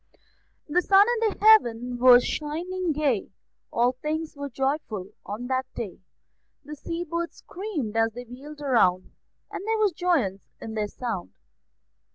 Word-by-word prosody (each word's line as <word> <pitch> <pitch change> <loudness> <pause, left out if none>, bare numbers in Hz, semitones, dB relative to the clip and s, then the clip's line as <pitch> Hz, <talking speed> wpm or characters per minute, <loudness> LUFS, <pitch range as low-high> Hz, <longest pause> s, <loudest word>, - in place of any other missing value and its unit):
The 340 +4 +2
sun 395 +2 +6 0.2
in 415 - -3
heaven 245 - +4
was 245 -1 +7
shining 340 +4 -2
gay; 280 -8 0 0.4
All 240 +2 +3
things 305 +5 -4
were 285 0 -5
joyful 265 -7 -2 0.2
on 215 +4 -5
that 260 +1 -1
day; 210 -7 -5 0.7
The 300 +1 -7
sea 335 +4 -4
birds 340 0 -4
screamed 345 - -5
as 225 0 +2
they 245 +2 -7
wheeled 285 +5 -11
round, 185 -10 +2 0.4
And - - -5
there 445 0 +1
was 425 -2 +3
joyance 295 - -1
in 220 - -7
their 215 -1 -1
sound. 100 - -5
275 Hz, 145 wpm, -26 LUFS, 230-335 Hz, 0.7 s, was